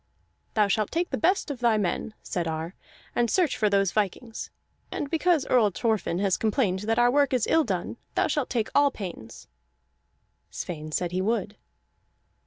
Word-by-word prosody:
"Thou 210 -2 +4
shalt 210 +1 +1
take 345 +2 -1
the - - +1
best 360 -2 +2
of 270 - -6
thy 235 -3 +3
men," 210 +2 -2
said 175 -2 -2
Ar, 160 +2 -3 0.4
"and 235 -1 +2
search 355 - +2
for 215 -2 +2
those 195 -2 +2
vikings. 220 +3 -2 0.4
And 285 - -4
because 325 -3 +2
Earl 235 -5 +4
Thorfinn 215 -4 -1
has 195 -1 +1
complained 215 -4 +1
that 225 - +2
our 240 0 +5
work 285 0 +3
is 245 -4 +2
ill 325 - +3
done, 190 0 -3 0.2
thou - - +3
shalt 295 -3 -1
take 230 -3 -1
all 285 0 +5
pains." 180 - -8 1.0
Sweyn 155 -3 -6
said 175 +2 -1
he 185 +1 -1
would. 210 0 -1
220 Hz, 175 wpm, -26 LUFS, 190-260 Hz, 1.0 s, our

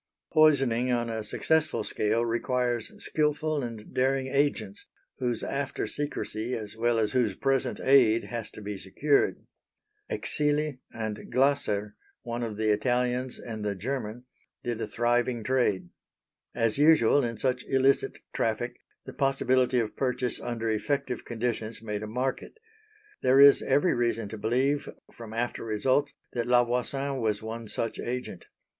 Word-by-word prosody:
Poisoning 135 -6 +4
on 120 -1 0
a 110 -1 -3
successful 150 +1 +1
scale 110 +3 0
requires 120 -1 -1
skilful 150 0 0
and 115 -4 -7
daring 135 +1 +1
agents, 130 -7 -1 0.3
whose 125 -2 -1
after 140 0 -2
secrecy 125 -5 -3
as 105 -1 -6
well 120 +1 +1
as 110 -2 +1
whose 120 -7 +1
present 135 0 0
aid 125 -5 +5
has 115 -2 -5
to 110 - -11
be 100 -1 -5
secured. 140 +9 +1 0.6
Exili 150 -2 0
and 110 -2 -5
Glasser 125 -7 +1 0.3
one 120 0 -4
of 110 -3 -4
the 110 0 +2
Italians 125 +3 0
and 110 -3 -6
the 105 -1 -1
German 120 +2 -4 0.4
did 120 -2 -3
a - - -2
thriving 120 0 0
trade. 105 -8 +1 0.7
As 115 +3 +1
usual 145 -3 +5
in 115 -2 -3
such 125 +2 0
illicit 135 +1 +2 0.2
traffic, - - -1 0.3
the - - -8
possibility 130 -2 +2
of 115 -3 -1
purchase 125 -2 -1
under 115 -1 -3
effective 125 +3 -1
conditions 115 -1 -3
made 105 -2 -4
a 110 - -5
market. 125 - -3 0.6
There 130 +1 +4
is 140 0 +8
every 145 +7 +2
reason 115 -3 0
to 110 - -6
believe 130 +7 +1 0.2
from 115 -2 -10
after 120 +2 -2
results 115 +6 +1 0.2
that 120 -1 -2
La 120 0 +5
Voisin 135 +3 -1
was 110 -1 0
one 115 +1 -6
such 115 +2 -3
agent. 125 +1 -5
120 Hz, 145 wpm, -28 LUFS, 110-135 Hz, 0.7 s, is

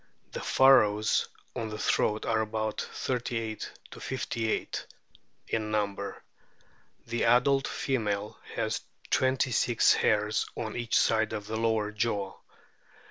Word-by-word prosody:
The - - -5
furrows 110 -6 +4 0.3
on 115 -3 -3
the 105 - -5
throat 105 0 +1
are 110 -1 +2
about 110 0 -2
38 115 -3 -3 0.3
58 115 -3 -2 0.6
in 110 -1 -1
number. 100 -2 -2 0.8
The 120 0 -1
adult 135 +3 +4
female 105 -6 -2 0.2
has - - -1 0.3
twenty 130 0 +2
six 115 0 +4
hairs 105 0 +1
on 110 -2 -4
each 120 -1 +1
side 110 -1 +2
of 105 -2 -4
the 110 +1 -4
lower 110 -2 +1
jaw. 105 -3 -1
110 Hz, 115 wpm, -29 LUFS, 105-120 Hz, 0.8 s, furrows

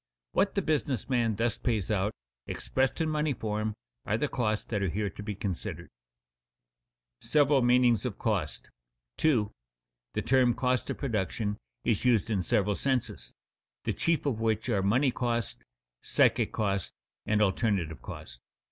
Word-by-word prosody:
What 195 - +2
the 200 - +1
business 145 - 0
man 120 -4 +2
thus 115 +1 0
pays 110 -6 0
out, 105 0 +1 0.4
expressed 130 +3 -1
in 160 - +2
money 150 -1 +1
form, 110 -2 -2 0.3
are 105 +1 0
the 150 - 0
costs 110 -6 -1
that 105 -4 -2
are 95 - +1
here 100 +3 -1
to 105 - -9
be 105 -1 -4
considered. 95 -3 -4 1.3
[Sidenote: - - -12
Several 145 -2 +5
meanings 120 -2 +4
of - - -3
cost] - - -2 0.5
2. 115 -10 +2 0.6
_The - - -1
term 125 -2 +4
cost 125 -1 0
of - - -2
production 105 - -1 0.3
is 110 - +1
used 115 -3 +3
in 100 -3 +1
several 100 +3 +1
senses, 115 - -2 0.5
the - - 0
chief 165 -2 0
of 130 -6 0
which 110 +2 0
are 105 -4 +2
money 125 +8 +3
cost, 120 -3 -2 0.4
psychic - - +3
cost, 100 -3 -1 0.3
and 105 0 +2
alternative 95 - +1
cost. - - -9
110 Hz, 155 wpm, -29 LUFS, 100-130 Hz, 1.3 s, Several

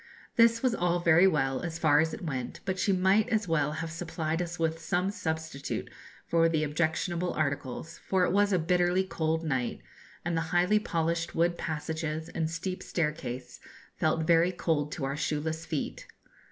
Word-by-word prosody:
This 230 0 +5
was 255 -2 +3
all 175 -4 +1
very 170 +2 +6
well, 135 -6 +1
as 165 -2 -4
far 155 -3 +4
as 160 +1 +2
it 225 - -7
went; 130 -6 -4
but 190 -1 -2
she 200 - +2
might 190 +3 +3
as 215 -3 +1
well 150 -3 +1
have 165 +1 -4
supplied 160 0 -2
us 175 0 -4
with 165 0 0
some 180 +4 0
substitute 160 -7 -4 0.3
for 165 0 +3
the 155 -2 +1
objectionable 165 +3 0
articles, 140 0 -3
for 190 -1 +3
it - - 0
was 205 +2 +3
a 185 - +4
bitterly 180 +2 +2
cold 160 -3 -1
night, 130 -6 -1 0.5
and 175 0 0
the 165 - +1
highly 180 +4 +3
polished 165 -3 -1
wood 170 +1 +2
passages 160 0 -3
and 160 -2 -2
steep 180 +3 -4
staircase 150 -6 -3 0.4
felt 160 +1 +1
very 170 +2 +4
cold 155 -4 -1
to 135 - -3
our 135 +1 -2
shoeless 155 +2 -2
feet. 155 -3 -4
165 Hz, 175 wpm, -29 LUFS, 155-180 Hz, 0.5 s, very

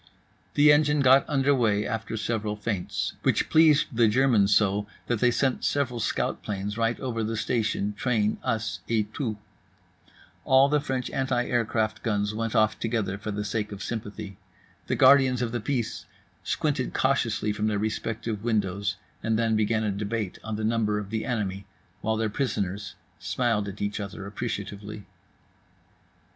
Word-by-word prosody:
The 145 +1 +7
engine 150 0 +4
got 135 +1 +5
under 140 -1 +3
way 110 -5 +2
after 115 0 -3
several 110 -1 -2
feints; 105 -3 -3
which - - +1
pleased 155 -4 +5
the 115 -1 +5
Germans 110 -3 +3
so 105 0 +2 0.2
that 120 -3 -1
they 125 - +4
sent 130 +1 0
several 130 -4 0
scout 105 - -1
planes 105 0 -4
right 115 +1 0
over 120 -4 -2
the 110 +1 -2
station, 110 -2 0
train, 110 -2 0
us 115 -3 -2
et 110 -2 0
tout. 115 -7 -3 1.1
All 135 +1 +5
the 150 0 +3
French 130 -3 -3
anticraft 120 -4 0
guns 105 -2 0
went 115 +1 -3
off 110 -1 +3
together 110 -4 -1
for 105 - -5
the 105 0 -3
sake 105 0 -2
of 100 -1 -6
sympathy; 105 -3 -6 0.5
the - - 0
guardians 130 -2 +5
of 115 - -2
the 120 -1 -2
peace 120 -2 -3 0.4
squinted 145 -4 -1
cautiously 120 -5 +1
from 105 +1 -1
their 105 -1 0
respective 110 0 -3
windows, 100 -4 0 0.3
and 110 0 0
then 115 -1 +1
began 110 +1 +1
a 105 - 0
debate 105 0 -3
on 110 -1 -4
the 110 - -4
number 110 -1 +1
of 105 -1 -5
the 110 -1 -2
enemy 100 -5 -3 0.3
while 110 0 0
their 110 0 0
prisoners 105 -4 -2 0.2
smiled 105 +2 0
at 100 +1 -5
each 100 +1 -2
other 100 0 -6
appreciatively. 105 -1 -5
110 Hz, 160 wpm, -26 LUFS, 105-120 Hz, 1.1 s, The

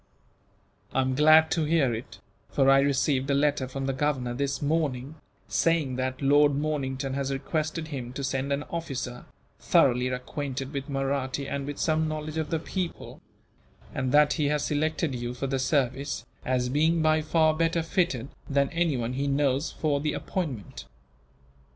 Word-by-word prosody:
"I 130 - +3
am 130 0 0
glad 155 +3 +6
to 160 -2 +1
hear 150 -6 +2
it, 115 +2 -7 0.3
for 135 -1 +4
I 135 - +6
received 140 0 +1
a 140 - +3
letter 145 -2 +1
from 135 +1 -4
the 135 - 0
Governor, 130 -3 -1
this 140 +2 -1
morning, 145 -3 -1 0.3
saying 160 -6 +1
that 130 +1 -2
Lord 145 +1 +5
Mornington 140 -2 -2
has 140 0 -2
requested 155 +3 -2
him 130 -5 -5
to 140 - -5
send 135 +1 -1
an 140 +1 0
officer, 130 -7 -4 0.3
thoroughly 125 -1 +3
acquainted 135 +2 -4
with 140 0 -4
Mahratti 135 0 -2
and 140 0 -3
with 145 - -5
some 160 0 +1
knowledge 155 0 -4
of 160 -1 -2
the 165 - 0
people; 175 +2 -5 0.7
and 130 -1 -1
that 150 +1 +5
he 150 -4 0
has 150 0 0
selected 155 0 0
you 120 0 -4
for 130 - -3
the 135 0 -1
service, 135 +1 0 0.2
as 125 -1 0
being 160 +4 +2
by 155 0 +3
far 155 0 +3
better 165 +1 +1
fitted 160 -7 0 0.2
than 140 -1 +2
anyone 140 -8 0
he 140 +2 -1
knows 140 +1 +1
for 145 -3 0
the 150 0 -1
appointment. 135 - -4
140 Hz, 165 wpm, -27 LUFS, 130-155 Hz, 0.7 s, glad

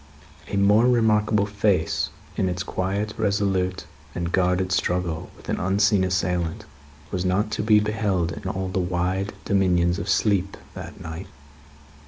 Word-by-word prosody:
A 100 - -2
more 105 +4 +5
remarkable 110 -3 +3
face 100 -5 +1 0.3
in 95 - +1
its 90 0 -2
quiet, 100 +3 -2
resolute, 100 -3 0 0.3
and 85 0 -2
guarded 90 0 +1
struggle 90 -3 -1
with - - -16
an - - -1
unseen 100 +1 +3
assailant, 90 -2 -1 0.5
was 90 -2 -1
not 95 +4 +1
to - - -1
be 105 0 +5
beheld 105 -5 0
in 95 - -5
all 95 0 -3
the 95 - -1
wide 90 +3 -1
dominions 90 -3 +2
of 95 - -4
sleep, 100 -3 +1 0.2
that - - -9
night. 80 +4 -7
95 Hz, 145 wpm, -24 LUFS, 90-105 Hz, 0.5 s, more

